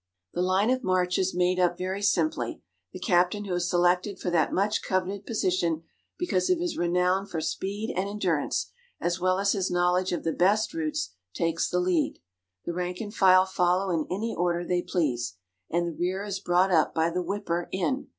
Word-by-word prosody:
The 175 - -1
line 190 +5 +2
of 255 0 0
march 180 -2 +1
is 190 -1 0
made 180 +1 +2
up 175 -1 +2
very 185 +2 -3
simply. 310 +10 0 0.3
The - - -8
captain 180 +1 +1
who 190 - -3
is 175 0 0
selected 180 +2 +2
for 180 - -3
that 165 -2 +2
much 205 +3 +1
coveted 190 +1 -2
position 180 -7 0 0.3
because 270 - 0
of 365 - +4
his 345 0 -2
renown 180 +3 +1
for 165 - -3
speed 195 +7 -3
and 190 +2 -1
endurance, 185 -8 -1 0.3
as 175 +1 -1
well 185 +1 +2
as 200 +1 +2
his 190 -3 0
knowledge 180 +1 +2
of 175 - -2
the 165 - 0
best 205 - +2
routes, 310 -1 -2 0.2
takes 165 0 0
the 180 - +1
lead. 180 -3 +1 0.5
The 170 - -2
rank 180 +1 -3
and 210 -2 -6
file 185 -3 +6
follow 185 +1 +1
in 160 -3 0
any 220 +5 -2
order 175 0 0
they 180 0 +1
please, 125 - -1 0.3
and 175 +1 +1
the 170 -2 -4
rear 185 +3 -1
is 200 -2 -4
brought 185 0 +2
up 160 -3 +3
by 165 +1 +2
the 180 +2 -1
whipper 175 -2 -2
in. 195 +9 -1
180 Hz, 195 wpm, -27 LUFS, 175-200 Hz, 0.5 s, file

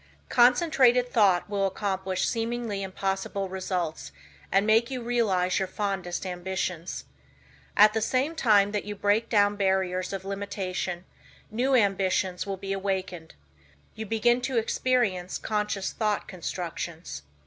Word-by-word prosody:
Concentrated 250 -1 +4
thought 195 -6 +4
will 200 -1 0
accomplish 190 -1 -2
seemingly 230 -3 -2
impossible 195 0 -3
results 180 - -3 0.4
and 195 +1 +3
make 225 +2 +4
you 260 -1 -3
realize 200 -7 +1
your 190 - -1
fondest 190 -2 -3
ambitions. 180 -1 -4 0.7
At 210 +1 +7
the 220 - 0
same 260 +7 +1
time 205 -9 +4
that 210 -1 -2
you 210 0 -6
break 205 +3 +1
down 205 -2 +3
barriers 190 -2 0
of 195 -1 -5
limitation 190 -3 -4 0.5
new 255 +5 +2
ambitions 190 -3 +1
will 195 -1 -3
be 195 +1 -4
awakened. 190 -4 -3 0.6
You 220 0 -6
begin 240 +3 +2
to 255 0 -1
experience 225 -5 0
conscious 210 -2 -2
thought 210 -2 -1
constructions. 170 - -5
200 Hz, 125 wpm, -27 LUFS, 185-225 Hz, 0.7 s, At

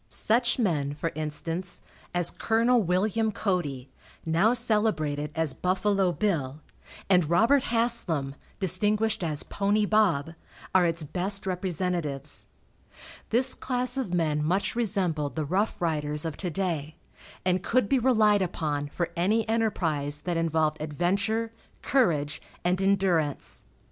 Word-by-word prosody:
Such 240 +2 +1
men, 150 - 0
for 165 +2 -3
instance, 165 +4 -4 0.3
as 175 -1 +3
Col. 230 +2 +2
Wm. 210 +4 +1
Cody, 155 - -2 0.4
now 170 +7 +3
celebrated 210 -12 0
as 160 -4 0
"Buffalo 190 +2 +1
Bill," 155 -9 -1 0.5
and 180 -5 +3
Robert 235 +10 +4
Haslam, 230 - +2 0.3
distinguished 210 +3 +1
as 155 -3 -2
"Pony 205 +1 0
Bob," 180 -8 +2 0.4
are 180 -2 +5
its 165 -1 -1
best 190 +6 -2
representatives. 180 -6 -2 0.8
This 255 +3 +3
class 250 -1 -2
of 260 -9 -2
men 155 -4 0
much 185 +9 0
resembled 185 -10 -1
the 155 -2 -2
rough 195 +8 -1
riders 150 -2 -1
of 160 -3 -3
to 185 - -3
day, 160 -4 -3 0.5
and 185 -1 +2
could 235 +1 +1
be 270 +2 +2
relied 215 -5 +3
upon 150 -5 -2
for 170 +4 -3
any 210 +6 +1
enterprise 160 -10 0
that 175 +1 -2
involved 160 -2 0
adventure, 200 +9 -1 0.3
courage 160 - +1 0.2
and 180 +2 +1
endurance. 190 -7 0
180 Hz, 125 wpm, -27 LUFS, 155-215 Hz, 0.8 s, are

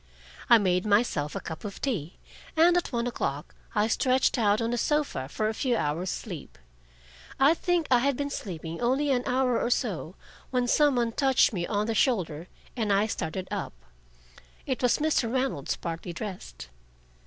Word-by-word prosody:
I 235 - +9
made 180 -3 +1
myself 205 -8 +1
a - - -1
cup 160 -1 -7
of 205 -2 -6
tea, 185 - -3 0.4
and 345 +2 +6
at 355 - 0
one 235 -1 -1
o'clock 145 - -3 0.2
I 210 - +3
stretched 255 +2 +2
out 210 -1 +3
on 230 0 -1
a - - 0
sofa 295 - -1
for 215 +6 -1
a 220 - -1
few 245 +1 0
hours' 165 +4 -1
sleep. 180 -8 -7 0.8
I 275 +4 +6
think 345 -1 0
I 250 - +6
had 275 +1 +1
been 285 0 -2
sleeping 165 - -6
only 270 +4 +1
an 250 -2 +2
hour 250 -1 +1
or - - 0
so, 200 -8 -1 0.3
when 250 -1 0
some 290 +2 +4
one 235 -1 +1
touched 265 -1 +3
me 175 -3 -2
on 205 0 0
the 225 - -1
shoulder 180 - 0 0.3
and 220 -4 -1
I 200 +1 +3
started 185 -3 -4
up. - - -3 0.9
It 260 -3 -2
was 250 -2 +3
Mr. 295 -7 +1
Reynolds, 255 - -1
partly 170 +1 -5
dressed. 115 - -7
230 Hz, 175 wpm, -27 LUFS, 180-260 Hz, 0.9 s, I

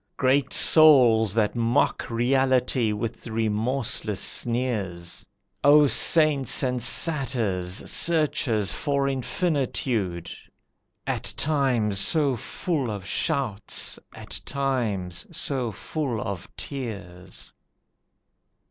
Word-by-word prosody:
Great 135 +1 +1
souls 120 - +5
that 110 -1 0
mock 120 +3 0
Reality 125 -1 +1
with 110 +3 -5
remorseless 110 -1 -2
sneers, 105 -8 -2 0.4
O 145 +1 +6
saints 150 -1 +3
and 125 -1 -1
satyrs, 110 - +1
searchers 140 - +1
for 140 -1 -1
infinitude! 125 - -2 0.7
At - - -2
times 125 -9 0
so 145 - +4
full 135 +3 -3
of 100 -3 -6
shouts, 115 -4 -2 0.2
at - - -7
times 110 -11 -3
so 130 -5 -3
full 130 - -4
of 100 -3 -6
tears! 100 - -8
120 Hz, 85 wpm, -24 LUFS, 105-140 Hz, 0.7 s, O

